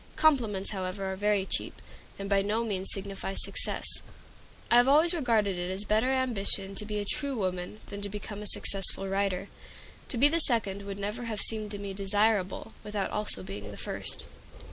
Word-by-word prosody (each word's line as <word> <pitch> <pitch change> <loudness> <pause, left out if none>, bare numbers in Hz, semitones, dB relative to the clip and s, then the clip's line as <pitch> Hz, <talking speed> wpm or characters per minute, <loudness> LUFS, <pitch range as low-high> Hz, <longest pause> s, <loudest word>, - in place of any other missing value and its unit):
Compliments, 230 -11 +2
however, 190 0 -3
are - - -4
very 205 0 +1
cheap, - - -3 0.4
and 195 - -5
by 200 0 +3
no 215 +3 0
means 195 -4 -2
signify 195 0 -4
success. - - +1 0.9
I 240 - +7
have 245 +1 +6
always 310 +5 +6
regarded 220 - +1
it 175 0 -3
as 190 +2 -1
a - - -13
better 220 +4 +2
ambition 210 -7 0
to 210 +1 -4
be 210 -1 -3
a 205 - -2
true 275 +5 0
woman 185 0 -3
than 200 0 -7
to 205 - -4
become 205 0 -6
a 210 - +2
successful 195 -1 +2
writer. 195 -1 -1 0.6
To 250 - -3
be 275 +5 +7
the 330 +3 +2
second 200 -7 +3
would 200 0 -5
never 210 +4 -4
have 220 -3 -3
seemed 215 -2 0
to 205 - -5
me 200 -1 -5
desirable, 205 +1 +1
without 210 -2 -3
also 210 - -1
being 100 +2 -7
the - - -9
first. - - -2
205 Hz, 190 wpm, -29 LUFS, 195-225 Hz, 0.9 s, I